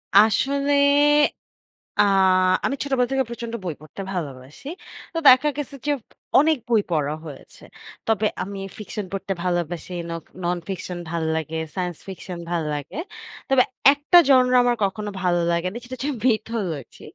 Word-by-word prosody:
আসলে 275 +7 +4 1.3
আ - - +7 0.6
আমি - - +1
ছোটবেলা 265 -3 +1
থেকে 270 0 +2
প্রচন্ড 235 -1 -6
বই 170 -4 -3
পড়তে 155 +6 -9
ভালোবাসি। 145 - -6 0.5
তো - - -1
দেখা 260 +3 +7
গেছে 295 -1 -5
যে, 295 - +3 0.5
অনেক 310 +1 +4
বই 230 -3 +4
পড়া 150 -3 0
হয়েছে। 145 -3 -12 0.4
তবে 220 -1 +2 0.2
আমি 200 +1 -6 0.2
ফিকশন 210 0 -5
পড়তে 195 0 -3
ভালোবাসি, 175 -1 -2 0.2
নক 165 -1 -5 0.2
ননফিকশন 175 +1 -3
ভাল্লাগে, 160 -1 -2 0.2
সায়েন্স 180 -3 -3
ফিকশন 185 -1 -7
ভাল্লাগে। 150 - -3 0.5
তবে 270 -1 +5 0.3
একটা 290 +5 +5
genre 255 -2 +5
আমার 245 0 +2
কখনো 205 +2 -2
ভালো 175 -1 +2
লাগে 170 +1 0
নি। - - -9
সেটা 255 - -7
হচ্ছে 280 +3 -2 0.2
mythology. 215 - -2
195 Hz, 135 wpm, -23 LUFS, 170-250 Hz, 1.3 s, আ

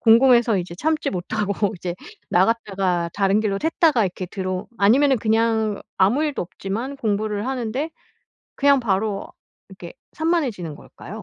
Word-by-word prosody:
궁금해서 235 -1 +5
이제 175 -1 -5
참지 315 - 0
못하고 200 +2 -1
이제 175 0 -4 0.4
나갔다가 190 -3 +1
다른 200 +1 +2
길로 200 -2 -1
샜다가 320 -5 +3
이렇게 185 0 -5
들어 185 +1 -4
아니면은 260 +6 +4
그냥 220 -1 +1 0.2
아무 205 +10 +3
일도 295 -2 -2
없지만 215 +10 -5
공부를 210 -1 -1
하는데 260 +4 -2 0.6
그냥 280 -1 +4
바로 205 -2 -1 0.4
이렇게 185 -3 -10 0.2
산만해지는 280 - -1
걸까요? 210 +8 -11
215 Hz, 335 characters per minute, -22 LUFS, 190-255 Hz, 0.6 s, 궁금해서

